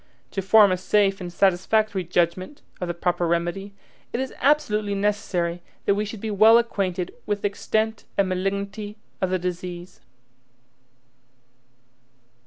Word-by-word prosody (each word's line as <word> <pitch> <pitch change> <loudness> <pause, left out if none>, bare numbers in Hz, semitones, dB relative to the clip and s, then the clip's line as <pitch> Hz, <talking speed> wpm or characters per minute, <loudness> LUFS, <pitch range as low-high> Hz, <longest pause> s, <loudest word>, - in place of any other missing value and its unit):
To 195 - -2
form 205 +1 +6
a 185 - +1
safe 195 +1 +2
and 175 -1 -5
satisfactory 195 +2 +2
judgment 175 - -1 0.2
of 180 - -2
the 175 - -2
proper 175 0 0
remedy, 175 +4 -2 0.4
it 235 - -2
is 265 0 -3
absolutely 215 -8 +2
necessary 185 -4 -1 0.2
that 200 - +4
we 210 +1 -1
should 210 0 -8
be 220 - -3
well 215 +3 +7
acquainted 190 -6 -1
with 205 -1 -2
the - - +3
extent 220 +2 -2
and 200 - +3
malignity 200 +3 -3 0.2
of 185 - +1
the 185 - +1
disease. 180 0 -6
195 Hz, 140 wpm, -24 LUFS, 180-210 Hz, 0.4 s, well